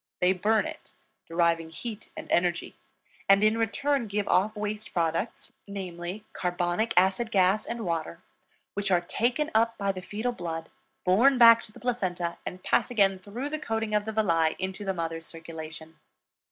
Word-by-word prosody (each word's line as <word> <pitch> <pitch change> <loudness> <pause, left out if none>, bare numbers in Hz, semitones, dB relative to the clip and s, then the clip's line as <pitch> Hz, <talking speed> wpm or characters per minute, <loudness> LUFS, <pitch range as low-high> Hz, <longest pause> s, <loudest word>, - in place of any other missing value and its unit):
They 180 +1 +4
burn 210 +3 +2
it, - - -9 0.3
deriving 165 -1 +1
heat 215 +6 -7
and - - -6
energy, 175 0 +1 0.5
and 195 +1 +6
in 215 +1 +4
return 255 +3 0
give 205 0 -2
off 200 +5 +2
waste 210 0 -4
products, 170 +5 -2
namely, 185 0 -6
carbonic 175 +4 -1
acid 190 +5 +3
gas 195 0 +3
and 235 -2 -4
water, 165 -1 -2 0.5
which 200 -1 -2
are 180 -2 +4
taken 240 - 0
up 230 +1 +2
by 200 -1 0
the 185 -1 -7
fetal 215 +6 -3
blood, 165 -6 -5 0.3
borne 240 +9 +5
back 230 -1 +9
to - - -12
the - - -14
placenta, 185 -8 -2
and 185 0 -6
pass - - +2
again 195 -5 +3
through 225 +9 -5
the 310 +1 -3
coating 225 -5 -2
of 210 0 +2
the 220 - -3
villi 165 -7 +2
into 190 +2 -4
the 195 -1 -1
mother's 165 -1 -4
circulation. 160 -1 -9
195 Hz, 165 wpm, -28 LUFS, 175-220 Hz, 0.5 s, back